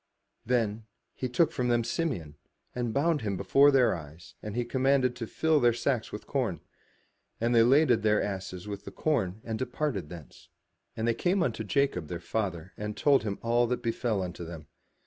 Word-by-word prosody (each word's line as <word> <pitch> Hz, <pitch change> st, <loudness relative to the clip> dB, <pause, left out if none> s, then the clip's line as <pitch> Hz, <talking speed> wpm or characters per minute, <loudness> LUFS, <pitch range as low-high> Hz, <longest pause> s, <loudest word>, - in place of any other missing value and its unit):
Then 115 Hz, -3 st, 0 dB, 0.3 s
he 130 Hz, -, -4 dB
took 145 Hz, +6 st, +2 dB
from 125 Hz, -, -1 dB
them 120 Hz, -1 st, +2 dB
Simeon, 120 Hz, -, -2 dB, 0.4 s
and 120 Hz, -2 st, -2 dB
bound 150 Hz, +5 st, +1 dB
him 100 Hz, -3 st, -2 dB
before 140 Hz, +8 st, +5 dB
their 135 Hz, -3 st, +4 dB
eyes 80 Hz, +1 st, -11 dB
and 105 Hz, 0 st, -6 dB
he 120 Hz, 0 st, 0 dB
commanded 130 Hz, 0 st, +2 dB
to 115 Hz, -, -5 dB
fill 160 Hz, +4 st, +2 dB
their 120 Hz, -3 st, +4 dB
sacks 120 Hz, -2 st, -1 dB
with 105 Hz, -, -7 dB
corn. 120 Hz, -, -1 dB, 0.8 s
And 115 Hz, +1 st, +1 dB
they 115 Hz, -, +6 dB
laded 125 Hz, -1 st, +4 dB
their 105 Hz, 0 st, +3 dB
asses 95 Hz, -1 st, -4 dB
with 100 Hz, -1 st, -6 dB
the -, -, -7 dB
corn, 110 Hz, -, -1 dB
and 110 Hz, -1 st, -4 dB
departed 125 Hz, -, -2 dB
thence. 85 Hz, -5 st, -12 dB, 0.5 s
And 110 Hz, +1 st, -1 dB
they 115 Hz, -, +3 dB
came 180 Hz, -, +1 dB
unto 115 Hz, -3 st, -2 dB
Jacob 110 Hz, -, 0 dB
their 85 Hz, 0 st, -5 dB
father 90 Hz, -3 st, -3 dB
and 105 Hz, 0 st, -5 dB
told 140 Hz, -2 st, +4 dB
him 105 Hz, -2 st, -3 dB
all 120 Hz, +1 st, +2 dB
that 125 Hz, +1 st, -2 dB
befell 115 Hz, -3 st, -1 dB
unto 90 Hz, -1 st, -6 dB
them. 80 Hz, -2 st, -8 dB
115 Hz, 185 wpm, -29 LUFS, 100-130 Hz, 0.8 s, they